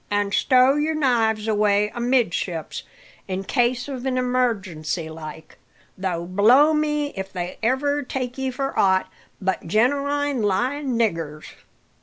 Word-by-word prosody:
"An' 205 -1 0
stow 255 +4 +4
your 310 +2 0
knives 225 -7 +1
away 210 -1 +2
amidships, 235 -9 -1 0.5
in 190 0 -3
case 245 +3 0
of 265 -3 -5
emargency 230 - -1
like; 155 0 -10 0.4
though 180 -3 -3
blow 235 - +5
me 300 -1 0
if 190 0 -5
they 175 -1 -5
ever 285 +5 +1
take 255 -2 -4
ye 265 -1 -2
for 270 +2 -3
aught 190 -1 +2 0.3
but 190 -3 -2
genewine 280 - +1
lying 250 +6 0
niggers!" 165 -9 -2
235 Hz, 125 wpm, -23 LUFS, 190-265 Hz, 0.5 s, blow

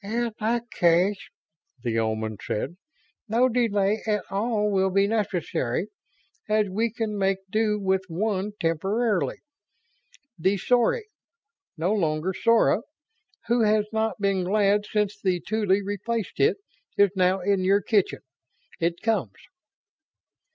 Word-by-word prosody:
"In 230 +2 -2
that 235 +3 -1
case," 180 +4 +3 0.6
the 115 -2 0
Omans 110 -1 -2
said, 140 +10 -3 0.5
"no 235 +4 +4
delay 215 -4 +1
at 210 -2 +1
all 210 +1 0
will 190 -1 +2
be 195 +1 +3
necessary, 195 - -1 0.6
as 215 -1 +2
we 220 +4 0
can 220 -2 -3
make 195 -1 +1
do 215 -1 +1
with 190 -1 0
one 200 +3 -2
temporarily. 195 +6 0 1.0
The 190 +4 +2
Sory, 250 - +2 0.7
no 175 +6 +1
longer 165 -2 0
Sora, 230 +1 +3 0.6
who 235 0 +2
has 210 0 +3
not 220 0 -1
been 195 -2 +1
glad 205 +2 +2
since 205 -1 -1
the 185 -2 +1
Tuly 205 +1 0
replaced 205 +2 -3
it, 430 +2 +3 0.4
is 200 -2 +5
now 185 0 +2
in 195 0 +1
your 195 +1 +3
kitchen. 205 -2 +1 0.6
It 170 +2 -1
comes." 225 -1 0
200 Hz, 125 wpm, -25 LUFS, 185-220 Hz, 1.0 s, is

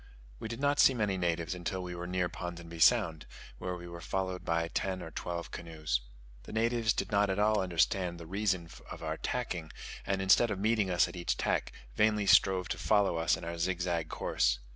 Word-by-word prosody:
We - - -5
did 115 +2 -6
not 145 +1 +1
see 130 - +6
many 105 -4 0
natives 85 -2 -1
until 90 +1 -4
we 90 0 -5
were 90 0 -5
near 90 0 0
Ponsonby 85 -1 -7
Sound, 80 -7 +4 0.3
where 90 0 -3
we 85 0 -9
were 85 0 -8
followed 95 +1 -2
by 85 0 0
ten 95 +2 -2
or 80 - -8
twelve 85 +1 -5
canoes. 75 -7 -3 0.4
The - - -11
natives 115 0 +1
did - - -2
not 100 0 +3
at 95 - 0
all 105 0 +3
understand 90 0 +1
the 85 - -8
reason 95 -1 -1 0.2
of - - -8
our - - -2
tacking, 90 -11 -3 0.3
and, 95 0 -1
instead 95 +5 +5
of 105 - -2
meeting 105 0 +1
us 90 -1 +3
at - - -9
each 85 -1 -1
tack, - - 0 0.2
vainly 105 - +2
strove 95 -2 +5
to - - -3
follow 100 -5 +2
us 80 +1 +2
in - - -10
our 85 0 -5
zigzag 85 -2 -1
course. - - +1
90 Hz, 205 wpm, -31 LUFS, 85-105 Hz, 0.4 s, see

